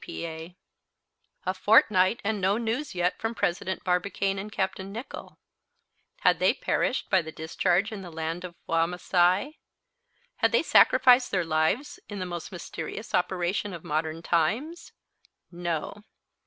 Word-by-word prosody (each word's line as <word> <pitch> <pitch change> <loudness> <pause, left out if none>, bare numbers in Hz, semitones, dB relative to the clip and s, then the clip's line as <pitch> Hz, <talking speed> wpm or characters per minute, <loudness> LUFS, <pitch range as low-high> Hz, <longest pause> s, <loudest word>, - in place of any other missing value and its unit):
P.P.A. 165 +1 -7 0.9
A 185 - 0
fortnight 190 +1 +4
and 210 -1 -1
no 195 +3 +2
news 235 +3 -3
yet 180 +1 0
from 225 +1 -3
President 185 0 -2
Barbicane 195 +2 0
and 210 +2 -7
Capt. 190 -1 -2
Nicholl. 200 +7 -8 0.8
Had - - +4
they - - +3
perished - - -1
by 190 - +5
the 160 -1 -8
discharge 175 +6 0
in 210 -3 -6
the 180 - -8
land 165 +2 -4
of 175 -1 -8
Wamasai? 180 - +1 0.8
Had - - +2
they - - +4
sacrificed 250 -1 +5
their 180 -3 0
lives 160 - 0
in 205 - -6
the 185 - -3
most 175 +1 -6
mysterious 175 +3 -7
operation 185 +2 0
of 165 - -10
modern 160 0 -2
times? 230 - -1 0.6
No. 175 +3 -4
185 Hz, 140 wpm, -27 LUFS, 170-210 Hz, 0.9 s, by